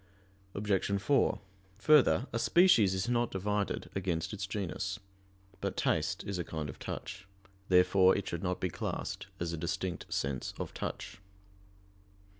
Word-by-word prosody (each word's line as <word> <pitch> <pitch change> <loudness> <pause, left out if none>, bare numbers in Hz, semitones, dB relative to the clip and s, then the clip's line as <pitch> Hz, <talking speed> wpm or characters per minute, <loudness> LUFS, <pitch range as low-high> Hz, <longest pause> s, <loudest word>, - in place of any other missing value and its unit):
Obj. 100 -1 0
4: 140 +7 +2 0.4
Further, 140 0 +5
a 115 - 0
species 115 - +5
is 95 +4 -1
not 120 -1 +1
divided 100 +1 -2
against 90 -2 -2
its 95 -2 -4
genus. 100 +1 -3 0.6
But - - -3
taste - - 0
is 100 -2 -4
a - - -1
kind 80 -3 -5
of 65 - -9
touch. 95 +1 -6 0.4
Therefore 95 +1 +5
it 100 - -4
should 85 - -3
not 90 -1 -1
be 90 - -1
classed - - -4
as 85 -1 -2
a - - -3
distinct 85 +2 -3
sense 65 -2 -2
of - - -5
touch. - - -5
95 Hz, 145 wpm, -32 LUFS, 90-105 Hz, 0.6 s, Further